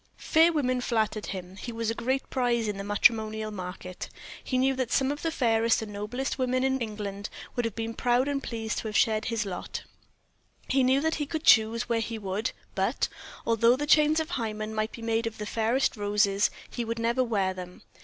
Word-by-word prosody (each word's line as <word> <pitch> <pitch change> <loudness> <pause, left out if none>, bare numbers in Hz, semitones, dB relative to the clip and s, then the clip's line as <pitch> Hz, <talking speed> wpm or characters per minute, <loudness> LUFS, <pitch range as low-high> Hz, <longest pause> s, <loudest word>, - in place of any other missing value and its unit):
Fair 325 +2 +4
women 255 -5 0
flattered 220 -3 0
him; 185 0 -6
he 240 - -6
was 225 -1 -1
a - - -1
great 260 +4 -1
prize 240 -3 +1
in 205 -1 -3
the - - -3
matrimonial 215 +1 +2
market. 185 -2 -6 0.3
He 255 - -1
knew 265 +1 +3
that 255 -2 -1
some 270 0 +2
of 290 - -5
the 330 - 0
fairest 230 -6 +2
and 210 -1 -8
noblest 245 +8 -3
women 255 0 +1
in 265 0 +1
England 205 -2 -4 0.3
would 245 - 0
have 230 - -3
been 225 0 -3
proud 245 +3 +2
and 280 -1 -1
pleased 225 -3 -3
to - - -5
have 210 - 0
shared 215 -1 +2
his 230 -2 -1
lot; 180 -3 -5 0.8
he 270 0 +3
knew 260 +2 +4
that 320 +1 +1
he 290 - -1
could 315 +1 -3
choose 230 -2 +5
where 235 -1 +1
he 225 0 -3
would, 205 +3 -2 0.2
but, - - 0 0.4
although 230 +1 +4
the 295 +3 -2
chains 305 +1 +5
of 320 +2 -3
Hymen 215 -6 -3
might 215 0 -1
be 230 - -9
made 225 0 0
of 225 - -6
the 210 - -4
fairest 230 +6 +1
roses, 205 -1 +2 0.2
he 240 - -4
would 230 0 -3
never 235 +3 +1
wear 200 -6 0
them. 180 -1 -9
230 Hz, 210 wpm, -28 LUFS, 215-255 Hz, 0.8 s, choose